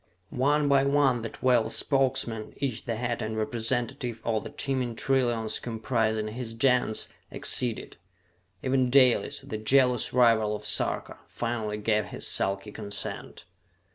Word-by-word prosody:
One 145 Hz, +3 st, +2 dB
by 140 Hz, -1 st, +4 dB
one 140 Hz, -3 st, +2 dB
the 115 Hz, -, -4 dB
twelve 120 Hz, -3 st, +1 dB
Spokesmen, 125 Hz, -5 st, 0 dB
each 135 Hz, -5 st, -3 dB
the 115 Hz, -3 st, -2 dB
head 120 Hz, +1 st, -2 dB
and 110 Hz, 0 st, -3 dB
representative 120 Hz, +1 st, -2 dB
of 110 Hz, -2 st, 0 dB
the -, -, -7 dB
teeming 130 Hz, -4 st, -2 dB
trillions 120 Hz, -4 st, 0 dB
comprising 110 Hz, -2 st, -1 dB
his 115 Hz, 0 st, -5 dB
Gens, 125 Hz, -2 st, +1 dB, 0.2 s
acceded. 120 Hz, -3 st, 0 dB, 0.7 s
Even 130 Hz, -1 st, +2 dB
Dalis, 125 Hz, -5 st, +4 dB
the 110 Hz, -, -6 dB
jealous 125 Hz, +1 st, +3 dB
rival 115 Hz, -4 st, +3 dB
of 105 Hz, 0 st, -8 dB
Sarka, 105 Hz, -, -1 dB
finally 115 Hz, -3 st, -3 dB
gave 105 Hz, -1 st, +1 dB
his -, -, -5 dB
sulky 100 Hz, +2 st, 0 dB
consent. 105 Hz, -1 st, -5 dB
120 Hz, 135 wpm, -27 LUFS, 110-130 Hz, 0.7 s, by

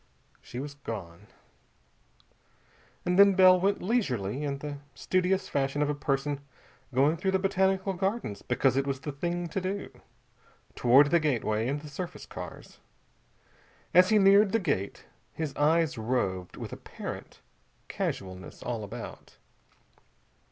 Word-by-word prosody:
She -, -, -10 dB
was 140 Hz, +2 st, -5 dB
gone. 105 Hz, -9 st, -8 dB, 1.8 s
And 180 Hz, +1 st, +2 dB
then 200 Hz, -1 st, +8 dB
Bell 185 Hz, -1 st, +7 dB
went 195 Hz, +2 st, +1 dB
leisurely, 140 Hz, -, 0 dB
in 140 Hz, -1 st, -2 dB
the 145 Hz, 0 st, -6 dB, 0.2 s
studious 185 Hz, +1 st, 0 dB
fashion 140 Hz, +1 st, 0 dB
of 150 Hz, -, 0 dB
a -, -, -1 dB
person 140 Hz, 0 st, -1 dB, 0.5 s
going 140 Hz, +6 st, +3 dB
through 190 Hz, +3 st, -1 dB
the 190 Hz, -, +3 dB
Botanical 190 Hz, 0 st, +1 dB
Gardens 190 Hz, -, -2 dB
because 125 Hz, +1 st, +1 dB
it 135 Hz, +1 st, +1 dB
was 135 Hz, -1 st, -2 dB
the 150 Hz, -, -4 dB
thing 175 Hz, +5 st, -3 dB
to 190 Hz, -, -2 dB
do, 195 Hz, +2 st, -4 dB, 0.8 s
toward 135 Hz, +4 st, +5 dB
the 170 Hz, -, +5 dB
gateway 115 Hz, -7 st, 0 dB
and 145 Hz, +2 st, -2 dB
the 150 Hz, -, -10 dB
surface 165 Hz, +5 st, -6 dB
cars. -, -, -9 dB, 1.1 s
As 180 Hz, +2 st, +7 dB
he 215 Hz, -, +5 dB
neared 200 Hz, +1 st, +6 dB
the 225 Hz, -, +4 dB
gate 100 Hz, -, -2 dB, 0.3 s
his 155 Hz, -3 st, -4 dB
eyes 155 Hz, -2 st, +2 dB
roved 100 Hz, -6 st, -2 dB
with -, -, -6 dB
apparent -, -, -8 dB, 0.5 s
casualness 95 Hz, -1 st, -5 dB
all 120 Hz, -3 st, -3 dB
about. 100 Hz, -, -9 dB
150 Hz, 135 wpm, -29 LUFS, 130-185 Hz, 1.8 s, then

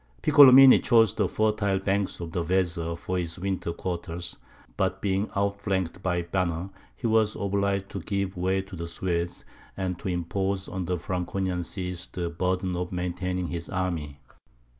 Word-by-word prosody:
Piccolomini 135 Hz, -3 st, +9 dB
chose 115 Hz, -4 st, +4 dB
the -, -, +1 dB
fertile 105 Hz, -2 st, +1 dB
banks 100 Hz, +1 st, -1 dB
of 85 Hz, -2 st, -6 dB
the 85 Hz, 0 st, -1 dB
Weser 85 Hz, -2 st, 0 dB
for 90 Hz, +2 st, -2 dB
his 85 Hz, -2 st, -4 dB
winter 95 Hz, -2 st, -2 dB
quarters; 85 Hz, 0 st, -4 dB, 0.4 s
but -, -, 0 dB
being 100 Hz, +1 st, 0 dB
outflanked 100 Hz, -3 st, -1 dB
by 90 Hz, -2 st, 0 dB
Banner, 85 Hz, +1 st, -2 dB, 0.2 s
he -, -, -8 dB
was 110 Hz, -1 st, +3 dB
obliged 100 Hz, 0 st, -1 dB
to 100 Hz, -, -5 dB
give 100 Hz, +2 st, -2 dB
way 95 Hz, +2 st, 0 dB
to 95 Hz, -1 st, -10 dB
the 85 Hz, 0 st, -5 dB
Swedes, 85 Hz, 0 st, -3 dB, 0.3 s
and 90 Hz, -2 st, -2 dB
to 105 Hz, -, -6 dB
impose 95 Hz, +2 st, -1 dB
on 95 Hz, -1 st, -4 dB
the 90 Hz, +1 st, -1 dB
Franconian 90 Hz, +1 st, -2 dB
sees 90 Hz, -1 st, -5 dB
the 85 Hz, -2 st, -4 dB
burden 90 Hz, +1 st, -1 dB
of 90 Hz, +1 st, -3 dB
maintaining 90 Hz, 0 st, -2 dB
his 85 Hz, -1 st, -5 dB
army. 85 Hz, -7 st, -3 dB
95 Hz, 160 wpm, -27 LUFS, 85-100 Hz, 0.4 s, Piccolomini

